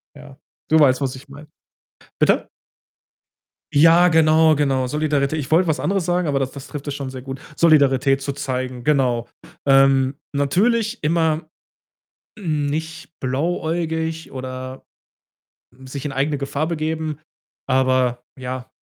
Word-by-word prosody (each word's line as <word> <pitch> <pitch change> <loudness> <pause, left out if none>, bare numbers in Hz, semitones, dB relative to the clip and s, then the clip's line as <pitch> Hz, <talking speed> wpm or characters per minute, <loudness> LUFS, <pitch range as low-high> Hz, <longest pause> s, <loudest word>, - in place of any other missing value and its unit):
Ja. 145 -1 -14 0.3
Du 160 - +5
weißt, 135 -3 +4
was 135 -2 -2
ich 135 +2 -14
meine. 145 +2 -12 0.7
Bitte? - - +2 1.2
Ja, 165 +4 +6
genau, 160 -1 +5
genau. 135 -3 +1
Solidaritä 150 +1 0
ich 145 -3 -4
wollte 170 +2 +3
was 155 - +1
anderes 195 -2 0
sagen, 175 -1 0
aber 140 -2 +1
das 135 -1 -2
das 140 -2 -10
trifft 145 -1 -7
es 145 - -3
schon 140 -2 -5
sehr 130 -1 -8
gut. 135 0 -7 0.2
Solidarität 140 -4 +4
zu 140 - -2
zeigen, 130 -3 -4
genau. 125 -4 +1 0.4
Ähm, 135 -1 +4 0.2
natürlich 215 - +1
immer 160 0 +1 0.9
nicht 160 -2 -3
blauäugig 160 +3 -2
oder 130 0 -7 1.0
sich 135 +1 -7
in 145 - -3
eigene 140 +2 -1
Gefahr 140 +2 -2
begeben, 155 -2 -3 0.5
aber 130 -2 +1
ja. 130 0 -6
145 Hz, 130 wpm, -21 LUFS, 130-160 Hz, 1.2 s, Ja